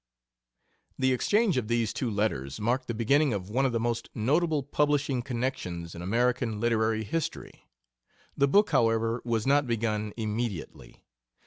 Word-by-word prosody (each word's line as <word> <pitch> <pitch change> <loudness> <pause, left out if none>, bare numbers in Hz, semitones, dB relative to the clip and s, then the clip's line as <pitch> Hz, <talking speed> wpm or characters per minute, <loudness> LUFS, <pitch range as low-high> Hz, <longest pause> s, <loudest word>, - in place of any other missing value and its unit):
The 130 0 +2
exchange 205 - +2
of 120 -4 -1
these 115 -2 0
two 125 - -2
letters 100 -11 -2
marked 125 +4 0
the 115 - -3
beginning 140 +4 +2
of 100 0 -5
one 135 +4 +2
of - - -2
the 115 - 0
most 115 0 -2
notable 150 +6 +1
publishing 145 -2 +1
connections 115 -10 -4
in 85 - -8
American 115 +2 0
literary 110 -1 +1
history. 155 +10 -5 0.7
The 140 - +3
book, 205 +9 +4
however, 115 +1 +2
was 115 -2 -1
not 140 0 +3
begun 110 -2 -1
immediately. 110 -5 -5
120 Hz, 145 wpm, -28 LUFS, 110-135 Hz, 0.7 s, book